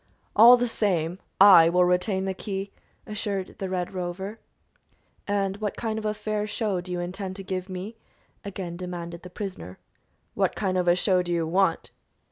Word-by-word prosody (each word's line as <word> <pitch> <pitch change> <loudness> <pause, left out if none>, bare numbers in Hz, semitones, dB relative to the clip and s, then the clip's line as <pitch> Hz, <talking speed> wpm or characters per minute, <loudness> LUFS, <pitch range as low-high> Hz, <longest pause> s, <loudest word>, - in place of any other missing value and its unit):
"All 235 +3 +9
the 245 0 0
same, 180 -6 -1 0.2
I 190 -4 +9
will 180 +1 +4
retain 185 +2 +1
the 190 - -1
key," 195 0 -5 0.3
assured 205 -3 -4
the 195 - -3
Red 180 -1 -3
Rover. 190 +4 -5 0.9
"And 200 -1 0
what 210 -1 -3
kind 220 -1 -2
of 215 - -7
a 215 0 0
fair 210 0 -2
show 205 -3 -1
do 180 +1 -7
you 180 - -2
intend 185 +2 -5
to 195 - -7
give 185 0 -4
me?" 190 +5 -6 0.5
again 185 -3 -6
demanded 175 -1 -6
the 180 - -10
prisoner. 180 - -7 0.6
"What - - 0
kind 190 -3 -1
of 180 -1 0
a 175 - +5
show 185 0 +2
do 175 -1 -4
you 170 -1 +1
want?" 180 +1 +1
190 Hz, 180 wpm, -26 LUFS, 180-205 Hz, 0.9 s, All